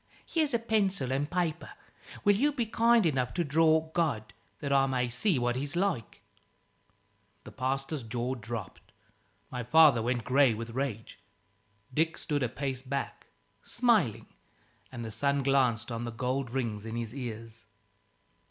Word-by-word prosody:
Here's 310 -3 0
a 235 - +3
pencil 200 - 0
and 140 +3 -1
paper. 175 -3 -2 0.5
Will 205 - +5
you 285 +8 +2
be 245 -5 -1
kind 230 -1 +3
enough 130 -6 0
to 175 - +1
draw 160 +1 +3
God? 145 -11 -1 0.2
that 140 -2 -2
I 135 0 +4
may 125 -2 0
see 140 - +1
what 120 0 0
he's 140 +4 -3
like." 175 - -2 1.2
The - - -11
pastor's 135 +3 -2
jaw 120 +2 -3
dropped. 115 -5 -7 0.6
My 125 - -3
father 145 0 +6
went 120 0 -1
grey 130 -2 +4
with 115 +1 -6
rage. 120 -3 -4 0.7
Dick 160 +4 +1
stood 145 -2 -2
a 125 - +1
pace 130 +1 -4
back, 135 +1 -4 0.3
smiling; 225 - +1 0.7
and 120 -3 -6
the 110 - -6
sun 140 +5 +1
glanced 125 -4 +2
on 115 0 -3
the 120 - -4
gold 125 +3 -2
rings 115 -5 -2
in 115 +1 -5
his 115 -1 -4
ears. 115 -4 -7
135 Hz, 150 wpm, -30 LUFS, 120-160 Hz, 1.2 s, father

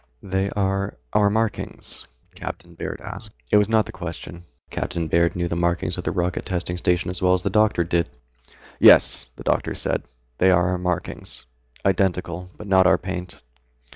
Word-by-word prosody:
"They 95 +1 -1
are 100 -1 -1 0.2
our 105 -1 +4
markings?" 110 +1 -2 0.3
Captain - - -7
Baird - - -6
asked. - - -7 0.2
It - - +6
was 105 0 +3
not 110 -2 +3
the - - -8
question. 85 -1 -7 0.3
Captain 85 -2 -2
Baird 85 +1 +2
knew 85 -1 -1
the 85 - -2
markings 85 0 0
of 90 - -5
the - - -1
Rocket 90 -1 -1
Testing 90 -1 -2
Station 90 0 +1
as 90 - -1
well 90 0 +4
as 90 - -1
the 100 - 0
doctor 105 -4 +3
did. 85 0 0 0.7
"Yes," - - +6
the - - -10
doctor - - 0
said, - - 0 0.4
"they 95 - +5
are 90 -1 +4
our 90 -1 -1
markings. 90 -7 -3 0.4
Identical. 90 -2 0
But 105 - -9
not 95 -2 +5
our 95 - +5
paint." 90 -4 -6
90 Hz, 175 wpm, -23 LUFS, 85-95 Hz, 0.7 s, It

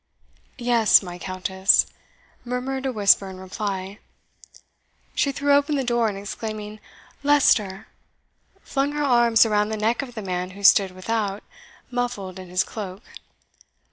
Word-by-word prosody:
"Yes, 235 -4 +4
my 175 -1 -8
Countess," 190 +1 +2 0.6
murmured 260 +2 -3
a - - -1
whisper 200 -3 +3
in 185 -1 -10
reply. 195 +1 -5 1.1
She 280 - +1
threw 285 +1 +1
open 285 +1 +2
the 275 - 0
door, 240 -2 +1
and 200 - -6
exclaiming, 215 +1 -6 0.4
"Leicester!" 220 -9 +2 0.8
flung 275 +1 -1
her 295 0 -1
arms 240 -4 +4
around 210 -1 +1
the 220 - -3
neck 225 +4 0
of 250 -3 -9
the 220 - -5
man 180 -1 -3
who 200 - -10
stood 195 0 +6
without, 200 +2 -3 0.5
muffled 225 -7 -3
in 185 -1 -10
his 185 +1 +1
cloak. 200 -1 -8
215 Hz, 140 wpm, -23 LUFS, 195-245 Hz, 1.1 s, stood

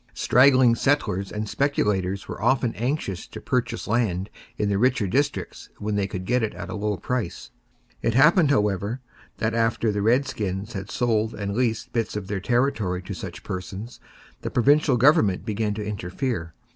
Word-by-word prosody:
Straggling 130 -1 +5
settlers 115 -8 0
and 105 0 -3
speculators 100 -8 0
were - - -7
often 120 0 +2
anxious 120 - -3
to - - -9
purchase 125 -2 -2
land 105 -4 0 0.3
in 105 - 0
the 100 -1 +1
richer 125 -2 +2
districts 135 +9 -2
when 105 +1 -3
they 100 -1 0
could 95 -2 -5
get 125 +4 +1
it 110 - -2
at - - -6
a - - -4
low 105 -1 -1
price. 125 -6 -4 0.5
It 115 - 0
happened, 150 +4 +5
however, 105 -2 +1 0.4
that 110 0 -1
after 115 -1 +1
the 105 0 -1
redskins 110 -4 0
had 95 -1 -5
sold 110 -2 0
and 100 -1 -3
leased 115 -2 -1
bits 115 -3 -1
of 100 -3 -5
their 100 -2 -2
territory 110 -6 0
to - - -6
such - - -7
persons, 95 +5 -6 0.4
the - - -3
provincial 140 +1 +3
government 110 -8 +4
began 105 -1 -1
to 105 -1 -4
interfere. 95 - -3
110 Hz, 170 wpm, -24 LUFS, 100-125 Hz, 0.5 s, Straggling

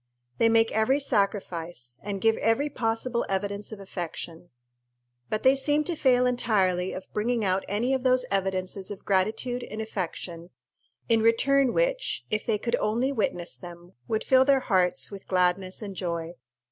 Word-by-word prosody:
They 230 - +5
make 225 0 +4
every 220 +6 +2
sacrifice, 175 - -2
and 200 -1 -4
give 225 0 +4
every 225 +7 +1
possible 230 +1 -1
evidence 200 +2 -2
of 215 - -7
affection; 175 -2 -7 0.8
but 215 - -2
they 260 +1 +6
seem 290 +2 +2
to 340 +3 -2
fail 250 -4 +3
entirely 190 -7 +1
of 185 - -8
bringing 225 +1 0
out 190 0 +1
any 230 +6 0
of 265 - 0
those 255 0 +3
evidences 190 0 -1
of 205 -2 -8
gratitude 220 +6 0
and 215 -2 -7
affection 180 -5 -5 0.6
in 230 -2 +3
return 260 +4 +3
which, - - 0
if 215 0 -1
they 220 -2 +2
could 235 +3 -1
only 235 +6 0
witness 180 -8 -2
them, 175 0 -11
would 220 - -1
fill 260 0 +5
their 270 -1 +3
hearts 185 -5 +1
with 195 -1 -10
gladness 185 +2 0
and 200 -2 -6
joy. 170 -2 -3
215 Hz, 160 wpm, -27 LUFS, 185-245 Hz, 0.8 s, they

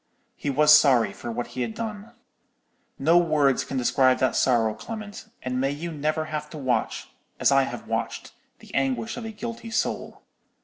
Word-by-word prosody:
He 145 - -4
was 150 +2 +7
sorry 125 -9 +4
for 120 - -6
what 120 +1 -4
he 130 - -3
had 115 -2 -3
done. 220 0 -6 0.8
No 165 +5 +4
words 150 -5 +2
can 135 - -5
describe 130 +1 +3
that 130 - +1
sorrow, 115 -4 +2
Clement: 215 - -8 0.2
and 130 0 -2
may 135 - +1
you 155 +4 -4
never 155 +1 -1
have 150 -1 -5
to 155 - -9
watch, 130 -4 -1 0.3
as - - +4
I - - +4
have - - -7
watched, - - -3 0.2
the - - -16
anguish 130 -4 -1
of 240 - -6
a 225 - -5
guilty 230 +2 -7
soul! 225 - -2
145 Hz, 180 wpm, -25 LUFS, 130-175 Hz, 0.8 s, was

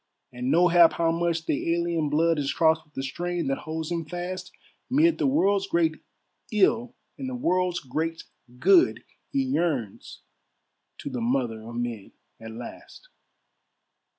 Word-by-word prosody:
And 125 +1 -3
nohap 170 +1 +6
how 165 -1 +1
much 170 0 0
of - - -25
the 165 +3 0
alien 170 -3 -1
blood 160 +2 +2
Is 140 -1 -1
crossed 160 0 +3
with 150 -1 -33
the 135 - -3
strain 175 +5 -3
that 135 - -1
holds 160 +1 -5
him 170 -1 -1
fast, 180 +3 -6 0.4
Mid 310 +5 +3
the - - +2
world's 200 -8 +2
great 165 -4 +1 0.5
ill 230 +4 +2 0.2
and 265 - -4
the 255 - -4
world's 180 -5 0
great 160 +5 -3 0.3
good, 345 - +4 0.3
He 275 -1 0
yearns 165 - -2 0.8
to 140 - -6
the 125 -2 -3
Mother 120 -2 -1
of 115 +2 -9
men 120 -4 -4 0.3
at 110 - -9
last. 120 - -10
165 Hz, 150 wpm, -26 LUFS, 140-180 Hz, 0.8 s, nohap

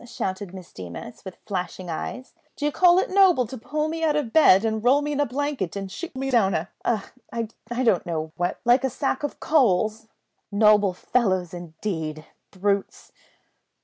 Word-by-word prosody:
shouted 190 -5 -4
Miss 185 -2 -11
Deemas, 90 +6 -9
with 190 -2 -9
flashing 185 -2 -4
eyes, 215 +10 -5 0.2
"d'you 295 0 -1
call 355 +3 +5
it 375 - +1
noble 375 -9 +5
to 245 - -8
pull 295 +6 -2
me 325 +1 -3
out 305 -2 +2
of 285 -7 -2
bed, 225 -10 +6
and 220 -1 -1
roll 275 +4 +4
me 295 - -2
in 290 - -2
a 290 - +2
blanket 265 - -2
and 195 -1 -5
shoot 345 - -7
me 270 +1 -2
down 205 -6 +3
a 160 +3 -2
a 230 -3 +1 0.3
I 235 +2 -4
don't 215 -7 +3
know 160 -2 -3
what, 175 +1 -2
like 245 +2 +4
a 265 - +1
sack 265 +2 -2
of 290 - -4
coals? 220 - +2 0.4
Noble 205 -2 +4
fellows, 185 -4 0
indeed! 160 -2 -5 0.2
Brutes!" 200 +1 -2
220 Hz, 180 wpm, -24 LUFS, 185-270 Hz, 0.4 s, bed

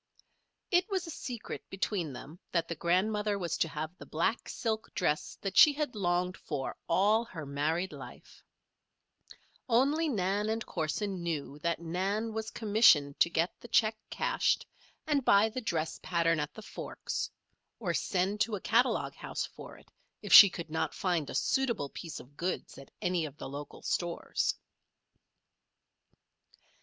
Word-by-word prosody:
It 360 +3 +3
was 380 -3 -1
a 330 - -6
secret 245 -6 -6
between 190 -4 -2
them 140 +7 -10
that 170 -2 0
the - - -3
grandmother 205 +5 +1
was 175 -4 -2
to - - +2
have 155 +2 -5
the - - -9
black 170 +9 -1
silk 220 -2 -3
dress 150 - -1
that 195 - -3
she 300 - +9
had 295 -2 -2
longed 180 -2 0
for 140 -3 -4
all 210 +6 +4
her 165 -9 -8
married 155 +6 -1
life; - - -12 1.3
only 285 +7 +3
Nan 205 -2 0
and 225 0 -2
Corson 185 +4 -2
knew 150 -4 -3
that 170 +2 -1
Nan 195 +6 -1
was 220 0 -3
commissioned 205 -10 +4
to 170 - +5
get 170 +1 0
the - - -11
check 220 -1 +3
cashed - - +1 0.4
and 290 -3 +1
buy 205 -1 +5
the 255 +4 -5
dress 160 -7 -2
pattern 165 -2 +1
at 150 0 -3
the 220 - -9
Forks; - - -4 0.5
or - - -1
send 195 +3 0
to 225 -1 +1
a - - -4
catalogue 240 +4 +2
house - - -4
for - - -11
it - - -21 0.3
if - - 0
she 200 - +12
could 170 -3 -7
not 160 - -1
find 175 -6 0
a - - -5
suitable 235 - +1
piece 165 +2 -7
of 140 +3 -15
goods 180 -1 -4
at 135 - -13
any 180 -2 +1
of 145 - -9
the - - -6
local 140 +1 -8
stores. 175 -1 -1
185 Hz, 160 wpm, -31 LUFS, 165-220 Hz, 1.3 s, she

